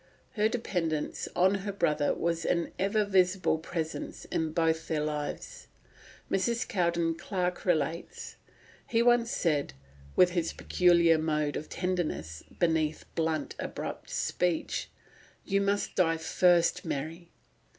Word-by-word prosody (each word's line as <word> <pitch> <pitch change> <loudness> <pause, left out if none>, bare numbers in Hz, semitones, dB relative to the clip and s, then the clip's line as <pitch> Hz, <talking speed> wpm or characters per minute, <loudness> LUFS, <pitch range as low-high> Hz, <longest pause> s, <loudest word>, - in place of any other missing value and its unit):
Her 215 -3 +2
dependence 175 -10 -2
on 185 +2 +4
her 200 +1 -3
brother 150 -6 +1
was 170 0 -1
an 170 -1 0
ever 205 +2 +2
visible 185 -3 +2
presence 160 -1 -5
in 160 -1 0
both 160 0 +1
their 155 -2 0
lives. 150 -1 -4 0.6
Mrs. 230 +5 0
Cowden 170 -5 +1
Clarke 180 +1 -3
relates: 165 -1 -1 0.5
"He 230 0 +2
once 240 -1 +4
said, 150 - 0 0.4
with 180 -1 +5
his 170 -2 -1
peculiar 170 -2 +4
mode 150 -2 0
of 155 - -5
tenderness 155 - -2 0.2
beneath 160 -3 +1
blunt, 160 -2 -1
abrupt - - -5
speech, 175 -2 -1 0.6
'You 200 -1 +1
must 200 0 0
die 165 -3 +2
first, 175 +1 +3
Mary. 165 +5 -4
170 Hz, 120 wpm, -29 LUFS, 160-185 Hz, 0.6 s, with